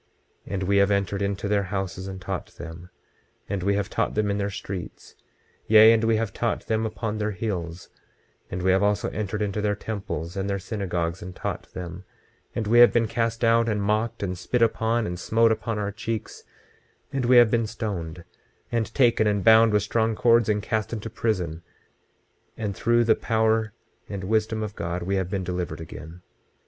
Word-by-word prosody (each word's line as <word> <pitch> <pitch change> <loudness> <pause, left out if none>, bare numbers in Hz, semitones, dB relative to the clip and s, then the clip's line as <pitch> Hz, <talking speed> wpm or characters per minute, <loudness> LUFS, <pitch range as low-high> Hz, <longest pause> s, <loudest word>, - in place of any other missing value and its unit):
26:29 - - -6
And 95 - -2
we 100 +2 +2
have 100 0 +4
entered 100 0 0
into 100 0 -2
their 100 -1 +2
houses 95 -1 -4
and 95 -1 -6
taught 95 0 -4
them, 85 +1 -9 0.6
and 100 -2 -2
we 100 +2 +1
have 100 -1 -1
taught - - -1
them 105 -1 +1
in 100 - -1
their 100 0 -1
streets; 100 -4 -7 0.5
yea, 110 +1 +8
and 115 0 +1
we 115 0 +3
have 110 -2 -1
taught 115 - -2
them 110 0 0
upon 110 0 -4
their 105 0 0
hills; 90 -4 -4 0.6
and 90 0 -4
we 95 - +4
have 95 +1 +3
also 105 0 +1
entered 105 0 -2
into 105 +1 -2
their 105 0 +1
temples 95 -6 -5
and 95 0 -2
their 100 - 0
synagogues 90 -4 -3
and 90 +1 -8
taught - - -5
them; 90 0 -6 0.5
and 115 - -1
we 115 +3 +4
have 120 - +9
been 115 -1 +2
cast 115 +1 -1
out, 115 0 +4
and 105 -2 0
mocked, 110 +2 0
and 90 -2 -3
spit 120 +6 +1
upon, 115 0 +1
and 90 -3 -4
smote 115 +4 +3
upon 110 0 -2
our 105 -1 -2
cheeks; 110 +1 -5 0.7
and 135 -2 0
we 125 +1 +6
have 120 -2 +7
been 115 -2 +1
stoned, 90 -7 -5 0.5
and 115 -2 -1
taken 120 -4 +4
and 100 -2 +1
bound 110 +2 +7
with 105 -1 +2
strong 110 +1 0
cords, 115 0 +4
and 105 -1 +1
cast 110 -1 -1
into 115 -1 -5
prison; 90 -9 -2 1.0
and 105 -3 -3
through 120 +3 +3
the 115 - +5
power 110 -1 +1 0.4
and 100 -2 -5
wisdom 110 +2 0
of 105 -1 -5
God 85 +1 -3
we 95 +2 0
have 95 -2 -2
been 95 -1 -2
delivered 90 -1 -3
again. 80 +2 -10
105 Hz, 195 wpm, -25 LUFS, 95-110 Hz, 1.0 s, have